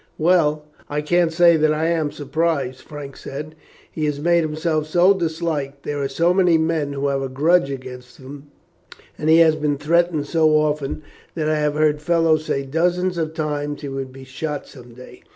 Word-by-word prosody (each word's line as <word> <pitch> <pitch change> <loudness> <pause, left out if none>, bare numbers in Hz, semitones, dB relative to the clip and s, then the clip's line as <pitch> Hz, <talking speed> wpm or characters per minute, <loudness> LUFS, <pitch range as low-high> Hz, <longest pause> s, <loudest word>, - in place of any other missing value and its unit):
"Well, 155 -3 +2 0.2
I 150 +1 -1
can't 170 +2 +2
say 170 0 +5
that 155 0 +2
I 155 +1 0
am 160 -3 0
surprised," 145 -3 -2
Frank 145 -2 -9
said. 150 +3 -7 0.4
"He 155 - -3
has 145 -1 -2
made 170 +2 +3
himself 155 0 -1
so 175 +5 +4
disliked, 160 -5 -3
there 145 -1 -3
are 140 - 0
so 170 +6 +1
many 180 -3 +4
men 160 -3 -1
who 140 0 -2
have 135 -1 -1
a 135 - -3
grudge 150 +4 +2
against 125 -2 -8
him, 140 +2 -11 0.7
and 155 - -2
he 160 - +7
has 160 -1 +5
been 150 -2 -1
threatened 165 +1 +1
so 155 0 +2
often, 150 -1 -1 0.3
that 155 -3 -1
I 155 0 +1
have 150 0 0
heard 150 -1 +1
fellows 165 -1 +2
say 140 - -1
dozens 175 +5 0
of 160 -1 -3
times 150 -2 -3
he 145 - -5
would 135 -1 -5
be 135 0 -12
shot 145 +3 -5
some 120 -3 -14
day. 125 +1 -13
150 Hz, 190 wpm, -21 LUFS, 140-165 Hz, 0.7 s, he